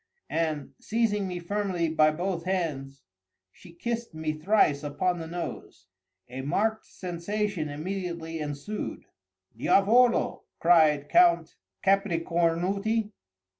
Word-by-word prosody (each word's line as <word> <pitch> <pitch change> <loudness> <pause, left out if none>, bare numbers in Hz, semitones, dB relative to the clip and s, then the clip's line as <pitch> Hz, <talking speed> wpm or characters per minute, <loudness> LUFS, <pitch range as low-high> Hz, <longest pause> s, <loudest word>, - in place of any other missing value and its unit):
—and, 155 -4 -1
seizing 215 -3 0
me 180 -1 -4
firmly 180 -1 -1
by 155 -1 +4
both 175 +2 -2
hands, 140 -8 -3 0.5
she 175 - -16
kissed 235 +3 -4
me 155 -1 -2
thrice 155 -3 +2
upon 170 +5 -1
the 165 - -6
nose. 170 - -6 0.4
A 130 +2 -6
marked 215 +10 0
sensation 185 -1 -3
immediately 170 +1 -4
ensued. 150 +8 -5 0.5
"Diavolo!" 235 +5 +3
cried 155 -4 +4
Count 350 0 +4 0.3
Capricornutti. 195 +3 +1
175 Hz, 100 wpm, -27 LUFS, 155-200 Hz, 0.5 s, by